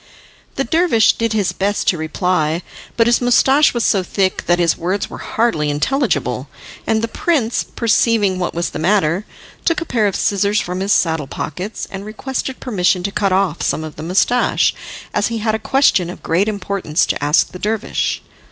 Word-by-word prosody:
The 270 - 0
dervish 320 -5 +3
did 230 -1 -1
his 205 -4 +1
best 200 +1 -1
to 175 - +1
reply, 160 0 0 0.3
but 230 - +4
his 240 +1 +3
moustache 265 +4 +4
was 235 -2 -1
so 195 - +3
thick 185 +1 -1
that 175 - +3
his 170 -2 +2
words 185 +4 -2
were - - -8
hardly 190 -11 0
intelligible, 265 - -1 0.4
and 220 0 +1
the - - +1
prince, 275 - 0
perceiving 225 -4 +1
what 175 - -2
was 170 +1 -2
the - - -5
matter, 180 +1 +1 0.4
took 335 +1 +1
a 340 - -5
pair 225 -8 +1
of 195 - -2
scissors 205 +1 +1
from 180 +1 -3
his 195 +2 -1
saddle 160 -7 +1
pockets, 180 +10 -5
and 195 0 -6
requested 260 +4 -4
permission 185 -6 0
to 200 - -2
cut 200 -1 0
off 185 -3 +1
some 155 - -1
of 155 -1 -8
the - - -8
moustache, 190 +9 +2 0.4
as - - +1
he 230 - -3
had 220 0 -1
a 220 - -1
question 245 -11 +2
of 180 - -9
great 180 +6 +1
importance 200 -5 -1
to - - -2
ask 150 +2 +3
the 180 - -9
dervish. 215 +2 -2
200 Hz, 190 wpm, -18 LUFS, 175-230 Hz, 0.4 s, but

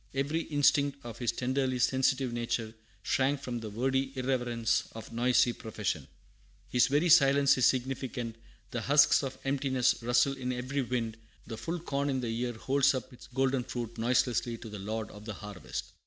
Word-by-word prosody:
Every 145 +4 0
instinct 145 -2 +2
of 115 -1 -8
his 120 -2 +1
tenderly 130 0 -1
sensitive 130 0 +1
nature 115 -2 -2 0.3
shrank 135 +1 +1
from 125 -3 -4
the 110 -1 -6
wordy 130 +5 0
irreverence 120 -3 0
of 115 +1 -9
noisy 120 +1 +3
profession. 105 - -4 0.6
His 125 -1 +4
very 145 +5 +2
silence 140 -3 +6
is 125 - +6
significant: 130 -2 -2 0.4
the 120 - -2
husks 145 +5 +5
of 135 -2 -5
emptiness 135 -3 +1
rustle 120 +3 +3
in 125 -2 -3
every 130 +3 -2
wind; 115 -3 -2 0.3
the 115 - -6
full 170 +9 -4
corn 140 -3 -2
in 135 -1 0
the 115 -2 -2
ear 120 +1 -2
holds 135 +4 +2
up 130 - -5
its 125 - -14
golden 130 0 +1
fruit 120 -2 -5
noiselessly 120 0 +1
to 115 0 -9
the 105 -1 -7
Lord 110 +2 -4
of 105 +1 -12
the 110 -3 -5
harvest. 105 -2 -7
125 Hz, 170 wpm, -30 LUFS, 115-135 Hz, 0.6 s, silence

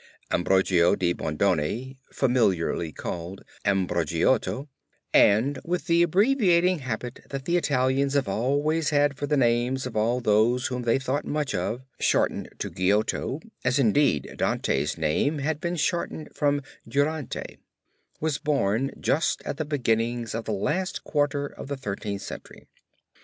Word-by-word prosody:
Ambrogio 90 -1 +3
de 90 -1 +1
Bondone 95 - -1 0.2
familiarly 95 - +1
called 85 +4 -6 0.2
Ambrogiotto 95 - +1 0.5
(and 125 +7 +4
with 180 +1 -2
the 170 -1 +3
abbreviating 185 - +3
habit 125 -1 -5
that 135 -1 -5
the 175 - +1
Italians 135 -3 +1
have 140 -6 +2
always 145 +9 +1
had 145 -1 +2
for 145 - -4
the 150 0 +2
names 125 +1 +1
of 125 - -6
all 115 +3 +1
those 115 +2 +3
of - - +1
whom 125 -1 -3
they 120 0 +2
thought 135 +2 -2
much 150 -4 -2 0.5
shortened - - +1
to - - -4
Giotto, 105 - 0 0.2
as 125 +2 +2
indeed 125 - +2
Dante's 75 +4 0
name 80 - +1
had 150 +2 -2
been 175 0 -1
shortened 160 -1 -2
from 145 -1 +1 0.2
Durante) 145 -1 -2 0.6
was 155 -2 -1
born 135 -3 +1
just 155 +3 0
at - - -4
the 155 - -2
beginning 120 -4 0
of 115 0 -4
the - - -2
last 180 - -1
quarter 145 -1 0
of 140 - -9
the 140 0 -4
Thirteenth 100 -4 -4
Century. - - -9
130 Hz, 140 wpm, -26 LUFS, 105-145 Hz, 0.6 s, and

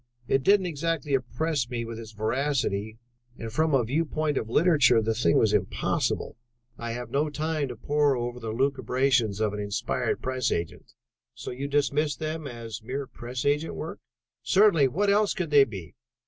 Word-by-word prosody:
It 135 - +2
didn't 195 +6 +4
exactly 165 -3 -2
impress 130 +1 -1
me 120 -2 -3
with 115 0 -7
its 110 -1 -9
veracity, 110 -2 -1 0.4
and, 115 -1 -7
from 155 +1 +2
a 130 - +3
viewpoint 155 +3 -1
of 110 - -2
literature, 145 -5 +4
the 110 0 0
thing 110 -7 +2
was - - +3
impossible. - - -1 0.4
I 115 -1 -5
have 120 +1 -6
no 150 +2 +1
time 155 0 -2
to 125 - -6
pore 145 +4 +1
over 120 0 -4
the 115 -2 -5
lucubrations 130 -3 +1
of 105 -2 0
an 105 - -4
inspired 110 +4 -1
press 130 -1 -1
agent." 85 -1 -4 0.4
"So - - -6
you 135 +3 -4
dismissed 145 +1 +1
them 155 -1 -4
as 115 -4 -7
mere 135 +5 -4
press 125 0 -6
agent 150 +3 +1
work?" - - -6 0.4
"Certainly. 190 -8 +4
What 200 +10 +1
else 205 0 +2
could 170 -4 -3
they 140 -2 +7
be? 95 - -9
130 Hz, 175 wpm, -27 LUFS, 115-150 Hz, 0.4 s, they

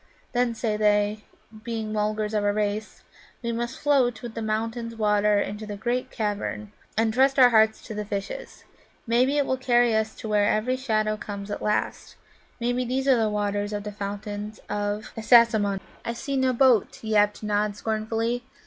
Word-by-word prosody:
Then, 245 -1 +1
say 220 -2 -1
they, 210 0 +2 0.4
being 225 -2 -4
Mulgars 215 0 -1
of 210 -1 +1
a 205 - +3
race, 210 +1 -3 0.4
we 235 - -1
must 235 +2 -3
float 260 -6 +2
with 235 -2 -6
the 230 - -5
mountain 225 +1 -3
water 210 -1 +3
into 210 +1 -4
the 205 -1 -5
great 240 +4 -2
cavern, 210 -1 -3 0.3
and 225 0 +2
trust 270 +3 +3
our 250 -2 +7
hearts 220 -1 +4
to 225 - -7
the 210 0 -3
fishes. 205 - -6 0.4
Maybe 250 +5 +2
it 285 - +2
will 260 - 0
carry 240 -2 +3
us 220 0 0
to - - -7
where 210 -1 +3
every 230 +4 +1
shadow 215 -5 0
comes 200 -1 -7
at - - -4
last; 210 0 -2 0.4
maybe 245 +1 0
these 260 +2 -2
are 265 - +6
the 225 -2 +1
waters 205 0 -1
of 205 -1 -3
the 210 - -5
Fountains 205 +1 -6
of 205 +1 -3
Assasimmon." 220 -3 +4 0.2
"I 235 - -3
see 275 +4 -4
no 260 -1 +2
boat," 250 -5 +3
yapped 210 -1 +2
Nod 210 0 0
scornfully. 225 +3 -2
220 Hz, 175 wpm, -25 LUFS, 210-240 Hz, 0.4 s, our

